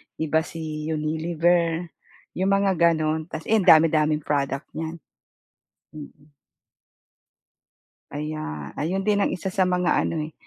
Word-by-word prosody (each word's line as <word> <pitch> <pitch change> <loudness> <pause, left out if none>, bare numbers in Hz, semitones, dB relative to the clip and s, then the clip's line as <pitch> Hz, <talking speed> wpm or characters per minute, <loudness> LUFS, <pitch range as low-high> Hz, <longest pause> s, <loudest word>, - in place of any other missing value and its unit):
iba 160 0 +1
si 155 -2 -6
Unilever, 165 +2 0 0.5
'yong 190 +1 +1
mga 195 0 +2
gano'n. 160 -1 +2
Tapos 160 -2 -7
'yan 215 -4 +1
ang - - +8
dami-daming 155 -1 +2
product 140 -1 -2
niyan, 160 +1 -5 1.0
mm. 150 0 -13 1.8
Aya 145 - -5
ayon 185 +6 -2
din 205 -1 +2
ang - - +1
isa 185 +1 -4
sa 195 - +1
mga 180 -1 +1
ano, 165 - -2
eh, 160 - -13
160 Hz, 125 wpm, -24 LUFS, 155-175 Hz, 1.8 s, ang